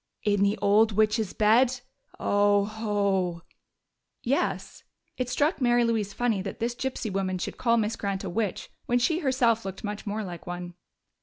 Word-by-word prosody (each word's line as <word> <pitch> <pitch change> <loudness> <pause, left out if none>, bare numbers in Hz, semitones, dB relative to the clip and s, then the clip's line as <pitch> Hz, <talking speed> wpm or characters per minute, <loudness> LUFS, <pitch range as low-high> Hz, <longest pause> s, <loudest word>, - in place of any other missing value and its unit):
"In 205 -1 +2
the 200 +1 +2
old 215 +2 +4
witch's 215 0 +1
bed? 240 +4 +3 0.4
Oh 205 0 +3
ho!" 200 -5 -1 0.8
"Yes." - - -1 0.3
It 255 -1 -3
struck 290 +5 +1
Mary 240 -1 +4
Louise 225 -3 0
funny 220 -1 0
that 195 0 -6
this 235 +1 -1
gypsy 245 -4 -4
woman 190 -1 -1
should 180 - -5
call 235 -1 +3
Miss 220 0 0
Grant 195 -1 -3
a 195 - -4
witch 210 0 -2 0.2
when 245 - +2
she 320 +7 +1
herself 250 -6 +2
looked 195 0 -7
much 210 0 -5
more 210 +2 -2
like 175 -3 -8
one. 175 0 -6
215 Hz, 165 wpm, -27 LUFS, 195-235 Hz, 0.8 s, old